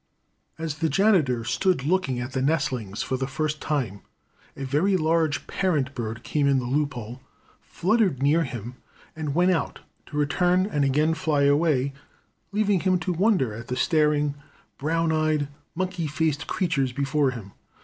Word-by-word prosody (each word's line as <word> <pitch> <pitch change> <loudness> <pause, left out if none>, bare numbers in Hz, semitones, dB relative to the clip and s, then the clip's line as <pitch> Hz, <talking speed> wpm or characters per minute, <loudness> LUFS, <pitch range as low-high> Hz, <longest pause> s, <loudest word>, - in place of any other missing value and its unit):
As 160 -2 -4
the 160 -1 +1
janitor 165 - +3
stood 180 - +1
looking 150 -6 0
at 125 +2 -4
the 130 - -1
nestlings 130 -8 -1
for 130 - -2
the 130 0 -2
first 155 +2 -2
time, 125 -10 -2 0.6
a 140 - -5
very 165 +9 +2
large 160 -2 +1
parent 150 -8 0
bird 115 -2 -5
came 145 -2 0
in 140 -1 +4
the 125 - -1
loop 140 +2 0
hole, 120 +2 -7 0.4
fluttered 195 - +1
near 150 +5 +3
him 120 -2 -7 0.4
and 150 -3 -3
went 180 +2 +4
out, 170 - -2 0.3
to 150 - -6
return 180 +5 +2
and 150 -8 0
again 150 +4 +2
fly 150 -3 +1
away, 140 -2 +2 0.6
leaving 205 -2 +2
him 185 +1 +2
to 180 +1 -2
wonder 180 - +2
at 115 +2 -8
the 125 - -2
staring, 150 0 +2 0.5
brown 165 +3 +1
eyed, 155 -2 +1 0.3
monkey 180 -2 -2
faced 150 0 -1
creatures 150 -8 0
before 140 +2 +1
him. 115 -6 -7
150 Hz, 160 wpm, -25 LUFS, 130-165 Hz, 0.6 s, in